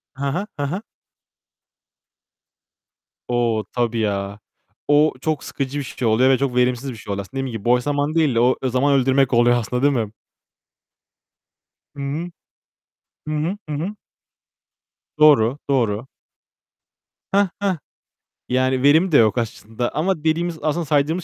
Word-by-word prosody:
Hı 135 - -6
hı. 185 +9 -3
Hı - - 0
hı. 180 +9 -3 2.5
O, 120 -3 0
tabii 120 -1 0
ya. 100 -1 -2 0.5
O 150 +1 +4
çok 155 0 -1
sıkıcı 140 +1 -4
bir - - -3
şey 125 -2 -3
oluyor 125 +4 +4
ve 135 - +4
çok 135 -2 -1
verimsiz 125 +1 +1
bir - - -8
şey 105 - -8
oluyor 100 - -3
aslında. 135 +5 -5
Dediğim 135 - -3
gibi 100 - -14
boş 125 +1 +3
zaman 145 +2 -1
değil 155 -6 +2
de 115 - +3
o 125 +2 +4
zaman 130 +3 +2
öldürmek 135 0 +2
oluyor 120 +1 +4
aslında 125 +2 -2
değil 145 0 +4
mi? 110 -4 -1 1.8
Hı 140 - -7
hı. 150 +6 -3 1.0
Hı 155 - -2
hı. 170 +7 -2
Hı 150 - -2
hı. 180 +8 -4 1.2
Doğru, 140 -4 +5
doğru. 120 -3 0 1.3
Heh, 200 0 +4
heh. 195 -4 0 0.7
Yani 130 +1 +1
verim 160 +6 +5
de 145 - +6
yok 110 +1 +4
aslında. 115 +1 -3
Ama 160 0 0
dediğimiz, 165 +1 0
aslında 160 +2 -1
saydığımız 150 +4 +1
135 Hz, 145 wpm, -21 LUFS, 120-155 Hz, 2.5 s, de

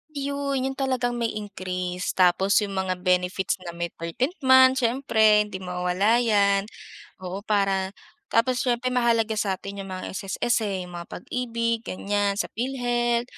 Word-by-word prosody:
Yun 280 -1 -2
yun 270 - -1
talagang 250 -3 -1
may 230 -2 -1
increase 185 -3 -4
tapos 190 +3 +4
yung 200 - -4
mga 185 -1 -1
benefits 180 +1 +1
na 170 -2 -8
may 170 0 -3
13th 255 - -3
month 260 -1 +6
siyempre 225 -4 +3
hindi 205 -3 -7
mawawala 180 +4 +1
yan 200 -3 +3 0.6
oo 185 +1 -4
para 195 -2 +1 0.3
tapos 245 +2 +2
siyempre 250 0 0
mahalaga 230 -3 +2
sa'tin 200 0 -3
yung 195 - -7
mga 185 0 -6
SSS 195 +5 -1
eh, 195 -4 -2
yung 180 - -11
mga 170 - -9
Pag-ibig 230 +1 -2
ganyan 205 -1 -1
sa - - 0
Philhealth, 240 -1 0
210 Hz, 150 wpm, -25 LUFS, 190-245 Hz, 0.6 s, month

